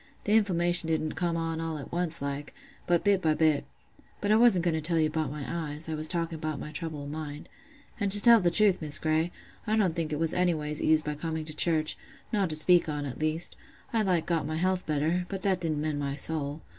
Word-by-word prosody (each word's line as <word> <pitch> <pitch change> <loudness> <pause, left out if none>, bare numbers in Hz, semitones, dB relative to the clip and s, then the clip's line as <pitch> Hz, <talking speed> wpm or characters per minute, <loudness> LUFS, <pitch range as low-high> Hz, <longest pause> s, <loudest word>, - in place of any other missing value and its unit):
Th' - - -5
inflammation 175 -5 +1
didn't 155 -1 -1
come 170 +1 -2
on 165 0 -3
all 165 -1 -4
at 140 - -9
once 170 -3 -2
like, 140 +1 -5 0.3
but 175 -1 +2
bit 200 -2 +2
by 155 -2 +1
bit—but 155 +6 -3
I - - +5
wasn't 220 -7 +5
going 170 - +1
to 160 - -2
tell 165 +2 -1
you 155 - +3
about 155 -2 -2
my 145 0 -6
eyes, 160 -2 -4
I 160 - -4
was 155 0 0
talking 165 -1 -3
about 155 -1 -4
my 150 - -7
trouble 155 -1 -6
o' - - -8
mind;—and 160 - -8
to 205 +1 +9
tell 235 +1 +7
the 175 - +2
truth, 195 +1 +2
Miss 150 -2 +5
Grey, 160 +2 0 0.4
I 215 - +1
don't 190 -7 +1
think 165 -3 -3
it 150 - -2
was 165 +1 -1
anyways 155 -4 -1
eased 155 0 +2
by 150 - -2
coming 160 +1 -5
to 155 - -6
church—nought 170 +5 0
to 155 - -1
speak 170 +2 +5
on, 145 -1 -3
at 130 -3 -7
least: 155 +2 +1 0.4
I 225 - +2
like 180 -5 0
got 165 -4 -1
my 155 - -3
health 185 +2 -1
better; 160 +4 -1
but 195 -2 -6
that 190 -3 0
didn't 155 -3 -2
mend 150 -1 -2
my 140 -1 -3
soul. 150 0 0
160 Hz, 230 wpm, -28 LUFS, 155-180 Hz, 0.4 s, to